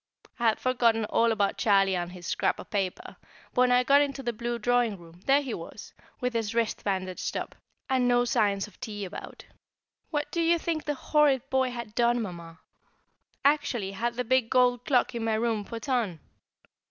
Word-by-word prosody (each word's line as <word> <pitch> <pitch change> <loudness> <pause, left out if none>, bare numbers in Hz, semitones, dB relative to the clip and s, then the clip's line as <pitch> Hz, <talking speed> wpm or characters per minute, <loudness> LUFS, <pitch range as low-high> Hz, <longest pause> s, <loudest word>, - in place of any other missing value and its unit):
I 235 - -1
had 220 - +2
forgotten 235 -3 +2
all 230 +2 +2
about 205 -3 0
Charlie 195 -3 +3
and 175 0 -3
his 180 -1 -10
scrap - - 0
of - - -11
paper, 195 -4 -3 0.4
but 250 - +2
when 250 0 +4
I 250 0 +5
got 280 +3 +5
into 275 -1 -2
the 240 -1 -2
blue 235 +1 -3
drawing 240 -2 +1
room, 170 0 -16
there 280 +2 +4
he 255 -4 -4
was, 170 +5 -9 0.3
with 250 0 -1
his 225 -1 -2
wrist 230 -2 0
bandaged 185 -2 -2
up, - - -5 0.3
and 260 -2 +2
no 245 0 +3
signs 200 -4 +1
of 210 -3 -17
tea 205 -2 -5
about. 185 - -9 0.6
What 295 -2 -2
do 340 - 0
you 335 +1 +3
think 325 -2 -3
the 295 -1 -1
horrid 275 -3 +2
boy 260 -1 +2
had 235 -3 -7
done, 240 +1 +2
Mamma? 170 -6 -7 0.8
Actually 270 -9 +1
had 235 +4 -2
the 250 - -1
big 250 -1 +2
gold 250 -1 +3
clock 255 -1 +2
in 235 -1 -3
my 225 -1 +1
room 220 -1 0
put 230 +4 -8
on! 230 - 0
235 Hz, 195 wpm, -28 LUFS, 205-255 Hz, 0.8 s, I